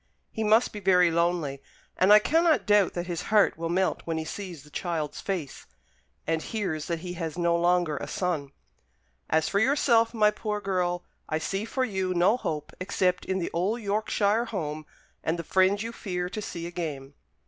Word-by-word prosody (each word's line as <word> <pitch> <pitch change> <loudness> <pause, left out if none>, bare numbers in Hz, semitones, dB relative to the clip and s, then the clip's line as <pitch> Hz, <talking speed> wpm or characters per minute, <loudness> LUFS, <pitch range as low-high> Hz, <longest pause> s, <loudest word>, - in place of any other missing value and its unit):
He 220 - -3
must 220 +3 +3
be 210 - -5
very 180 -3 +4
lonely; 165 -5 0 0.3
and 190 +2 +4
I 210 - +11
cannot 320 +8 +3
doubt 205 -3 +4
that 175 0 -3
his 175 -2 -3
heart 215 -2 +4
will 165 +1 -4
melt 185 +2 +1
when 165 -1 -3
he 160 - -3
sees 175 -4 -7
the 150 - -18
child's 160 -4 -3
face, 175 -9 -4 0.6
and 165 0 0
hears 175 -9 -3
that 170 -2 -2
he 180 0 -5
has 165 -2 -5
no 170 -1 +2
longer 175 -3 +2
a - - -5
son. 165 -7 -2 0.8
As 160 0 +2
for 200 - +1
yourself, 235 -2 +3
my 215 -2 +3
poor 210 0 -3
girl, 180 -3 -1 0.3
I 155 - 0
see 195 +6 -2
for 260 +3 -1
you 190 -5 -2
no 180 +6 +4
hope 155 -11 -4
except 185 -1 0
in 190 - -1
the 175 - -3
old 195 +8 0
Yorkshire 210 +1 +1
home, 155 -8 -4 0.4
and 160 +2 0
the 170 - -4
friends 190 +4 +2
you 230 - -4
fear 180 -5 -4
to 215 - -5
see 170 -4 -6
again." 150 -6 -5
180 Hz, 190 wpm, -27 LUFS, 165-210 Hz, 0.8 s, I